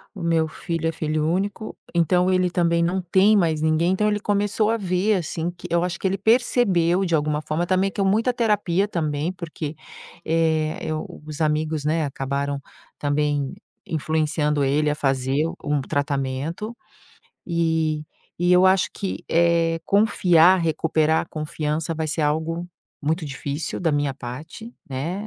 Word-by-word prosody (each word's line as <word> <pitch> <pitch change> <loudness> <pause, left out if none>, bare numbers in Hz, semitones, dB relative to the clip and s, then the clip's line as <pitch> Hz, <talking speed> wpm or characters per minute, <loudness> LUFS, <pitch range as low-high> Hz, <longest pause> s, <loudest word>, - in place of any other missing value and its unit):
o - - -7
meu 165 -1 +2
filho 165 +1 -3
é - - +1
filho 155 -1 -1
único. 200 +5 -2 0.2
Então 180 +2 +3
ele 185 -1 +2
também 170 -1 +1
não 180 +3 0
tem 195 +4 +4
mais 160 -5 +1
ninguém. 160 +3 +2
Então 210 +3 +1
ele 210 0 +1
começou 205 +1 +1
a 230 - +1
ver, 190 +1 +1
assim, 170 -1 -2
que 175 0 -10
eu 170 0 +2
acho 180 -1 -3
que - - 0
ele 190 +1 0
percebeu 195 -5 +2
de 170 - -2
alguma 150 -1 +1
forma 160 +3 -2
também 190 +2 +2
que 200 - -3
é - - +3
um - - +2
muita 225 +5 +2
terapia 205 -5 +1
também, 155 -3 -1
porque, 165 -4 -6 0.5
eh 160 -1 0
eh, - - -1 0.4
os 155 0 -7
amigos, 155 -1 0
né, 160 +1 +1
acabaram 140 0 -2 0.4
também 145 -1 0 0.3
influenciando 155 -1 0
ele 145 +3 +2
a 150 - 0
fazer 135 -2 0 0.3
um 145 -1 0
tratamento. 145 - -2 0.7
E 160 -3 0 0.3
e 175 +1 +2
eu 180 +1 +6
acho 190 0 +3
que, 195 -2 -4
eh, 170 -1 +2
confiar 185 -4 +4
recuperar 160 -1 +1
a - - -9
confiança 155 +1 -3
vai 160 0 -2
ser 155 +1 -1
algo 160 +3 -1 0.4
muito 160 +4 0
difícil 140 +2 -4
da 165 -4 +1
minha 145 -1 0
parte, 150 - -8
né? 165 +10 -4
165 Hz, 160 wpm, -23 LUFS, 150-185 Hz, 0.7 s, eu